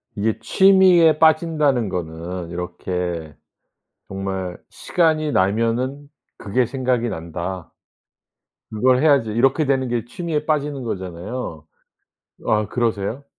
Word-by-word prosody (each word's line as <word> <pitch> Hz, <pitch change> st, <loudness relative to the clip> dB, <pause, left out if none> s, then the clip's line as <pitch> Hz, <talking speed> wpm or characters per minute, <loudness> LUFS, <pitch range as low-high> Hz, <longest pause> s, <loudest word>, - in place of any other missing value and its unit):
이게 110 Hz, +1 st, -1 dB
취미에 180 Hz, +3 st, +5 dB
빠진다는 155 Hz, -, +3 dB
거는 85 Hz, 0 st, -5 dB
이렇게 90 Hz, -2 st, -4 dB, 0.7 s
정말 95 Hz, -2 st, -4 dB
'시간이 155 Hz, -3 st, 0 dB
나면은 115 Hz, +8 st, 0 dB, 0.3 s
그게 120 Hz, +5 st, 0 dB
생각이 125 Hz, -2 st, -1 dB
난다. 85 Hz, +1 st, -6 dB, 1.0 s
그걸 125 Hz, +4 st, +3 dB
해야지.' 140 Hz, -8 st, +3 dB
이렇게 135 Hz, +7 st, +2 dB
되는 135 Hz, -1 st, +1 dB
게 120 Hz, -2 st, -2 dB
취미에 150 Hz, +3 st, -3 dB
빠지는 145 Hz, -3 st, -1 dB
거잖아요. 95 Hz, -4 st, -6 dB, 0.8 s
아 105 Hz, -1 st, +1 dB
그러세요? 115 Hz, +2 st, -2 dB
115 Hz, 245 characters per minute, -21 LUFS, 95-145 Hz, 1.0 s, 취미에